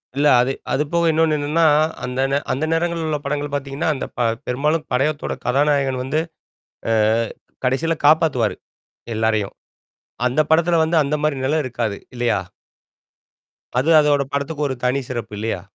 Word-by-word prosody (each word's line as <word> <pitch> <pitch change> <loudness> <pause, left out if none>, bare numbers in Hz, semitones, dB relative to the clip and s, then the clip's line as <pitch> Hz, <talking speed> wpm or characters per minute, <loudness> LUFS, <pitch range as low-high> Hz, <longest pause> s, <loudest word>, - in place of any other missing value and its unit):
இல்ல 145 +2 +3
அது 125 - +1 0.2
அதுபோக 160 +4 +1
இன்னொன்னு 160 -1 +2
என்னன்னா, 155 +3 +1 0.4
அந்த 125 +1 -2
நே 140 - +3
அந்த 140 +4 0
நேரங்கள் 170 0 0
உள்ள 150 -1 0
படங்கள் 145 0 -2
பாத்தீங்கன்னா, 140 +3 -2
அந்த 130 - -4
ப - - -6 0.3
பெரும்பாலும் 150 +5 0
படயத்தோட 145 +4 0
கதாநாயகன் 135 0 +1
வந்து 140 +4 0 0.7
அ - - +3 0.7
கடைசில 135 +6 +1
காப்பாத்துவாரு, 150 -8 +3 0.6
எல்லாரையும் 110 -2 0 0.7
அந்த 125 +5 +3
படத்துல 165 +1 +3
வந்து 160 +1 +1
அந்த 140 +2 -1
மாரி 150 -2 +1
நிலம் 155 +2 +1
இருக்காது 115 -5 -3 0.2
இல்லயா? 120 -4 +1 1.4
அது 140 +6 0
அதோட 145 -1 +2
படத்துக்கு 145 +1 -2
ஒரு 130 - -3
தனி 130 +2 +1
சிறப்பு 115 -4 -5
இல்லயா? 105 -3 -3
140 Hz, 140 wpm, -20 LUFS, 125-155 Hz, 1.4 s, இல்ல